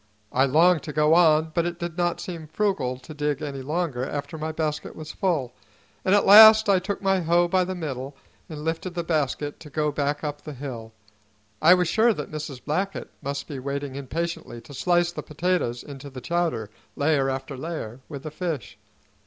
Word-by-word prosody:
I 130 +2 +3
longed 160 +4 +4
to 150 - -5
go 150 +1 +4
on; 160 -2 +4
but 170 +1 +1
it 175 0 -4
did 170 -2 -5
not 175 -1 0
seem 165 -4 -6
frugal 160 -9 -1
to 130 +5 -11
dig 150 -1 -1
any 140 -2 -4
longer 150 -2 -2
after 145 +3 -4
my 160 0 -3
basket 155 -2 -3
was 155 0 -7
full, 155 - -1 0.5
and 190 - +4
at 205 - +3
last 220 +2 +10
I 195 -2 +4
took 200 +2 -4
my 195 -1 +3
hoe 175 +1 +3
by 185 +1 +2
the 185 +1 -4
middle 140 -5 -5 0.3
and 150 -2 -7
lifted 165 +2 -3
the 170 - -1
basket 145 -3 -1
to 150 - -11
go 150 +1 0
back 145 +1 -1
up 145 -1 -4
the 150 - -8
hill. 125 -5 -7 0.7
I 170 +4 +8
was 180 -2 +1
sure 220 +7 +4
that 150 -7 -6
Mrs. 150 -4 -6
Blackett 190 +7 -2
must 140 0 -4
be 140 -4 -6
waiting 140 +1 -4
impatiently 155 -1 -4
to 140 - -13
slice 175 +4 +2
the - - -5
potatoes 155 -6 -1
into 140 -1 -9
the 130 -1 -8
chowder, 165 -9 -1 0.2
layer 140 -2 +2
after 135 +1 -4
layer, 130 -5 -6
with 140 -4 -7
the 155 - -6
fish. 155 - -4
155 Hz, 195 wpm, -25 LUFS, 140-175 Hz, 0.7 s, last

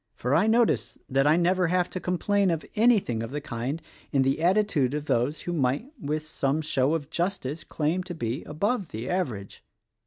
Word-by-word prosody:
For 125 +3 -1
I 180 +8 +4
notice 230 +1 +2
that 135 +2 +2
I 155 +2 +5
never 180 +1 +2
have 180 +1 +2
to 185 - -3
complain 195 +2 +1
of 165 -2 -1
anything 210 - +3
of 115 - -4
the 145 +3 -3
kind 135 +1 -4 0.3
in 135 -1 +3
the 135 +4 +1
attitude 175 -7 +2
of 150 0 -3
those 125 +6 0
who 175 - -3
might 145 - 0
with 155 +1 -2
some 155 0 -1
show 145 0 +1
of 150 -2 -5
justice 170 -4 -2
claim 160 +4 -1
to 175 -1 -6
be 120 -3 -3
above 200 +5 -1
the 115 +3 -5
average. 125 - -3
155 Hz, 190 wpm, -27 LUFS, 135-180 Hz, 0.3 s, I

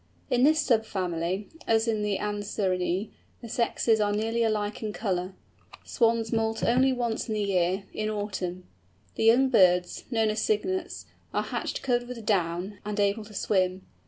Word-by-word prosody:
In 245 -1 +3
this 310 +4 +5
sub 235 -7 +3
family, 185 0 -2 0.2
as 225 0 +3
in 220 -2 0
the 205 -2 0
Anserinæ, 200 -2 -1 0.3
the 235 - -8
sexes 225 -1 +1
are 205 0 +2
nearly 225 +3 0
alike 210 -2 0
in 215 -2 -3
colour. 185 -4 -2 0.5
Swans 230 -2 +1
moult 225 0 0
only 260 +3 +4
once 240 -3 -2
in 220 - -2
the 210 - 0
year, 190 0 +1
in 215 0 -2
autumn. 190 -4 -3 0.5
The - - -1
young 250 +4 +5
birds—known 215 +2 +3
as 215 +1 -2
Cygnets—are 345 - -2
hatched - - -4
covered 245 -2 0
with 240 -3 -7
down, 185 0 -1
and 210 0 -4
able 205 +2 +1
to 210 0 -13
swim. 185 -2 0
215 Hz, 160 wpm, -27 LUFS, 190-230 Hz, 0.5 s, this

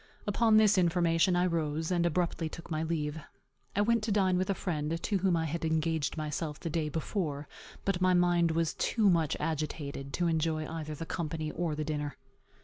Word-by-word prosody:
Upon 215 +1 +4
this 210 -3 +5
information 170 0 +3
I 175 +1 +3
rose, 160 -1 -1
and 175 -1 +2
abruptly 170 -1 -1
took 165 +2 -10
my 155 0 0
leave. 160 -2 -2 0.6
I 205 - +3
went 230 +2 +3
to 225 - -1
dine 190 -3 +3
with 185 +1 0
a 195 - +2
friend, 160 -2 -2
to 200 - 0
whom 180 -2 +2
I 160 - 0
had 165 +2 -3
engaged 160 -1 0
myself 150 0 -3
the 165 - -4
day 155 -1 -1
before; 150 -2 -3 0.4
but 195 -2 0
my 185 0 +4
mind 175 -1 +3
was 165 0 0
too 210 -5 +2
much 165 -3 +1
agitated 145 -3 -3
to 175 - 0
enjoy 160 -1 0
either 155 -2 -5
the 165 - -6
company 155 -2 -3
or 170 -3 -2
the 155 - -2
dinner. 150 -1 -3
165 Hz, 195 wpm, -31 LUFS, 155-180 Hz, 0.6 s, this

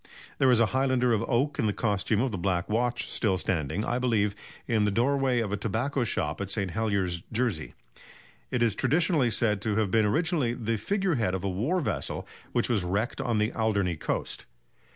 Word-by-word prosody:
There 130 - +5
is 125 -2 +5
a 115 - +5
highlander 130 -2 +2
of 110 0 +1
oak 135 +4 0
in 110 - +2
the 105 - +1
costume 105 0 0
of 130 -1 0
the 100 - -3
Black 90 0 0
Watch 120 +3 0
still 95 -5 +1
standing, 85 - -1
I 120 - -1
believe, 105 -5 +1 0.3
in 110 -3 +2
the 105 - +2
doorway 125 +3 +2
of 105 -3 -3
a 105 - 0
tobacco 120 +6 -1
shop 80 -7 -2
at 100 - -3
St. 100 -3 -1
Heliers, 100 -5 -1
Jersey. 110 -9 -1 0.7
It 120 - +1
is 115 -3 +3
traditionally 155 - +2
said 105 -3 +1
to 105 -1 -1
have 105 -3 +1
been 110 0 +3
originally 150 - +1
the 115 -1 -1
figure 195 - 0
head 95 -4 +1
of 95 - -4
a 100 - 0
war 120 - 0
vessel - - -3 0.2
which 120 - +1
was 110 -6 +1
wrecked 100 +10 -1
on 120 -4 0
the 105 +1 +1
Alderney 100 -6 0
coast. 75 - -3
110 Hz, 200 wpm, -28 LUFS, 100-125 Hz, 0.7 s, There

